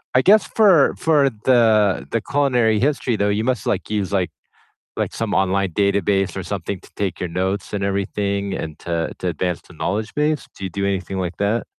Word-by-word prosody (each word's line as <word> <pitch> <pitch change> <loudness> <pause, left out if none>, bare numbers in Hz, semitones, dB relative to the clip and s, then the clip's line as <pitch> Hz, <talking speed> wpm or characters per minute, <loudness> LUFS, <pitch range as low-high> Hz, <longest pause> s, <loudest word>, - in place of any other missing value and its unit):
I 125 - +6
guess 205 +8 +5
for 190 -10 +4
for 145 -4 +3 0.2
the 110 -6 +3
the 115 - 0
culinary 125 -6 +2
history 135 -3 +1
though, 100 0 +1
you 110 +2 -1
must, 125 -4 -1
like, 95 - -1
use, 100 -3 -1
like 95 -3 0 0.7
like, - - -2
some 115 -2 -2
online 95 0 +1
database 100 -1 +1
or 95 - -3
something 95 0 -4
to - - -18
take 95 -4 -2
your 90 - -2
notes 95 +4 -2
and 100 -1 -2
everything 100 0 -1
and 80 -3 -5
to 85 -1 -2
to 90 - -2
advance 90 +1 -2
the 85 - -14
knowledge 105 +7 -3
base. 150 0 0
Do 100 - -7
you 95 - -3
do 100 +3 -3
anything 95 -1 -2
like 90 -2 -3
that? 105 +3 0
100 Hz, 200 wpm, -21 LUFS, 95-115 Hz, 0.7 s, I